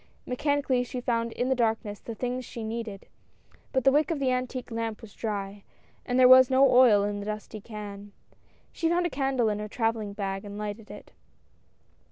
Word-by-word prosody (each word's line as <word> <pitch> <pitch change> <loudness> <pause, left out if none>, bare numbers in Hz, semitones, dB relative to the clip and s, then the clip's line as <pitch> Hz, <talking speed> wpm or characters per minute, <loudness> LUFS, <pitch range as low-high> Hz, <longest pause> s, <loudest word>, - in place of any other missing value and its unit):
Mechanically 275 -1 0
she 250 +1 -5
found 230 -1 -1
in 250 +1 -1
the - - +4
darkness 220 -4 -1
the 230 - -7
things 250 +2 -3
she 235 -2 -7
needed, 220 -3 -5 0.7
but 260 -2 +1
the 270 - +6
wick 295 +1 +2
of 330 - -1
the 270 -2 +1
antique 255 0 -3
lamp 225 -1 -3
was 220 -3 -13
dry, 200 -2 -4 0.4
and 245 - 0
there 255 - +8
was 255 0 +8
no 265 +1 +5
oil 240 -5 +6
in 205 0 -2
the 200 - -6
dusty 215 0 -6
can. 205 -2 -8 0.6
She 330 - -1
found 350 +1 +2
a 345 - -1
candle 270 -4 0
in 210 -1 -1
her 210 - -4
travelling 225 -2 -1
bag 195 -1 -4
and 205 0 -8
lighted 210 +1 -6
it. 205 0 -11
230 Hz, 195 wpm, -27 LUFS, 210-255 Hz, 0.7 s, there